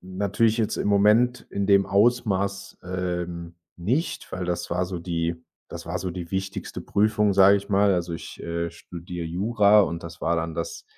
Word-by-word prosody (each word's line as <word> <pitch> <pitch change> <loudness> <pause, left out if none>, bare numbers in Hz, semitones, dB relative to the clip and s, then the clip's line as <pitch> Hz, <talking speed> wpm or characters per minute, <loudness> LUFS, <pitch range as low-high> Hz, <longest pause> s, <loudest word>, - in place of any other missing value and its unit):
natürlich 100 +5 0
jetzt 110 - 0
im - - -1
Moment 105 +5 +3
in 100 -1 -2
dem 100 -1 +4
Ausmaß, 100 -2 +1
ähm, 90 -2 -4 0.2
nicht, 125 - -2
weil 90 - -3
das 90 -1 -3
war 90 +1 0
so 90 0 -5
die 85 -1 -2 0.3
das - - -8
war - - -3
so 95 - -4
die 85 -1 -7
wichtigste 95 0 -4
Prüfung, 105 0 +2
sage 100 +1 +7
ich 100 +1 -6
mal. 100 0 +3
Also, 85 -2 -1
ich, - - -9
äh, 85 0 -3
studiere 85 +1 -8
Jura 105 +4 +4
und 85 -3 -3
das 85 0 -10
war 85 +1 +1
dann 80 0 -3
das 430 - -5
95 Hz, 180 wpm, -25 LUFS, 85-100 Hz, 0.3 s, sage